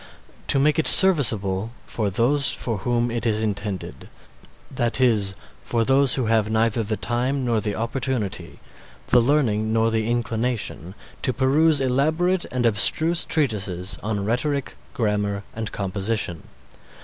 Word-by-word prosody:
To - - +3
make 150 +3 +2
it 160 - +1
serviceable 110 - +4
for 105 -3 -2
those 130 +8 +1
for 115 -5 -3
whom 120 +3 0
it 120 0 -2
is 110 0 0
intended, 100 -3 -5 0.6
that 120 +1 0
is, 105 -6 +2 0.3
for 115 -1 -1
those 135 +1 +3
who 130 - -1
have 110 -1 +1
neither 115 +1 +1
the 110 0 -2
time 125 +3 -1
nor 115 -3 +1
the 105 -1 -3
opportunity, 115 -3 -3 0.5
the 125 - +5
learning 115 -5 +1
nor 115 0 +2
the 110 0 -1
inclination, 115 -6 -2 0.3
to 130 - +1
peruse 145 +5 +3
elaborate 155 +8 +1
and 125 -1 -1
abstruse 155 - +3
treatises 100 - -2
on 105 -2 -3
Rhetoric, 135 +5 -1 0.2
Grammar, 105 -3 -1
and 110 -1 -5
Composition. 100 -3 -3
115 Hz, 135 wpm, -23 LUFS, 105-130 Hz, 0.6 s, the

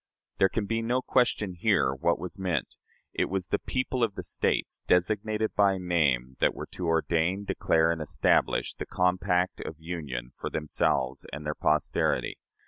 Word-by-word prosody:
There 95 - +5
can 110 +1 -2
be 115 +2 -1
no 125 +3 0
question 115 -6 +1
here 75 -6 +2
what 75 +6 +1
was 90 +3 -6
meant: 90 -8 -2 0.4
it - - +1
was 95 -1 -2
"the 100 - +1
people 130 -1 -1
of 110 -4 0
the - - -5
States," - - 0
designated 105 +4 +1
by 100 -2 +3
name, 70 -8 +1
that - - +2
were - - -5
to 90 - -4
"ordain, 85 +4 +1
declare, 80 -3 +2
and 80 -1 -3
establish" 75 - +1
the - - -7
compact 90 0 +1
of 80 - -6
union 75 -7 -5
for - - -3
themselves 70 -3 0
and 75 +1 -6
their 75 - -1
posterity. 75 0 0
90 Hz, 165 wpm, -28 LUFS, 80-100 Hz, 0.4 s, There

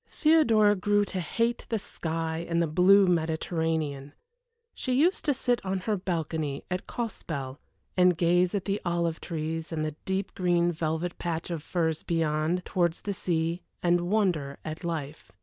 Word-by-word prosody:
Theodora 235 -10 +4
grew 205 +2 +2
to 190 - -3
hate 230 +8 -1
the 225 - +1
sky 165 -4 -3
and 170 0 +1
the 170 - +3
blue 185 +5 +5
Mediterranean. 160 -4 -1 0.6
She 255 - -2
used 325 +9 +3
to 290 - +3
sit 245 0 0
on 190 -1 -2
her 215 +3 0
balcony 160 -6 -2
at 180 +1 -3
Costebelle 145 - -4 0.4
and 180 -2 +4
gaze 175 +2 +3
at 195 - -2
the 200 +1 -1
olive 170 -2 -1
trees, 160 0 -4
and 155 -1 -1
the 155 -1 -4
deep 190 +1 -2
green 175 -1 +2
velvet 160 +1 -2
patch 170 0 -3
of 165 -3 -3
firs 160 -1 -1
beyond, 165 +1 0
towards 175 -2 0
the 200 - -3
sea, 170 -1 -1 0.2
and 175 0 +2
wonder 175 -10 +1
at 155 +2 -5
life. 160 -3 -5
170 Hz, 160 wpm, -28 LUFS, 160-190 Hz, 0.6 s, blue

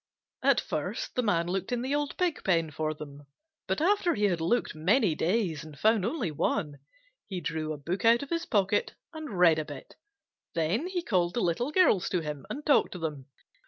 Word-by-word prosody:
At - - +4
first - - -3
the 250 - +1
Man 180 -7 +1
looked 190 +4 -2
in 245 -1 -1
the 265 +2 -1
old 290 -1 -1
Pig 355 -4 0
pen 165 -4 +1
for 155 +1 -2
them, 145 -1 -10 0.4
but 190 - 0
after 360 +1 +2
he 210 - -2
had 180 -5 +2
looked 235 +9 +1
many 180 - +2
days 170 -1 0
and 155 -2 -11
found 220 +1 +3
only 235 - -2
one, 150 -1 -1 0.5
he 190 -3 -4
drew 155 -1 -3
a 155 - -4
book 170 +7 -4
out 235 +3 +5
of 280 - -10
his 335 0 -1
pocket 205 -1 +1 0.2
and 310 - -6
read 165 -3 +5
a 155 - -3
bit. 145 -3 -10 0.6
Then 170 - 0
he 365 -2 -2
called 180 - +1
the 240 - +1
Little 210 - 0
Girls 260 - +3
to 180 - 0
him 150 -3 -6
and 295 - -6
talked 290 - +3
to - - -6
them. 150 -5 -5
185 Hz, 205 wpm, -29 LUFS, 160-245 Hz, 0.6 s, out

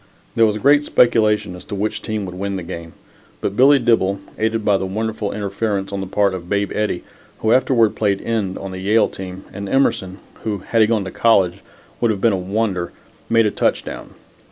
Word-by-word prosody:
There 115 -1 +4
was 105 0 -1
great 145 +6 +4
speculation 105 -7 +2
as 90 - -10
to 105 - -5
which 105 +2 -2
team 110 -2 -3
would 90 - -7
win 100 +2 -3
the 95 - -4
game, 85 -1 -8 0.5
but 100 - -3
Billy 140 +4 +6
Dibble, 115 -6 +2 0.2
aided 110 0 0
by 100 -2 +4
the 95 - -3
wonderful 110 +1 -3
interference 100 -1 -2
on 100 - -2
the 95 - -5
part 100 0 +1
of 90 -1 -7
Babe 100 0 0
Eddie, 105 -4 -1 0.4
who 110 - +2
afterward 120 -3 +3
played 100 -2 +1
end 105 -5 -2
on 95 -1 -6
the 95 - -6
Yale 105 +4 +3
team, 95 0 -8
and 100 0 -6
Emerson, 95 -8 +1 0.3
who, 105 -2 -1
had 115 - +2
he 110 - +5
gone 110 -3 +1
to 95 - -5
college, 95 -6 +3 0.4
would 120 - +2
have 105 -3 0
been 115 +1 +3
a - - 0
wonder, 95 -1 -2 0.4
made 115 -1 +4
a 105 - +1
touchdown. - - -2
105 Hz, 205 wpm, -20 LUFS, 95-110 Hz, 0.5 s, Billy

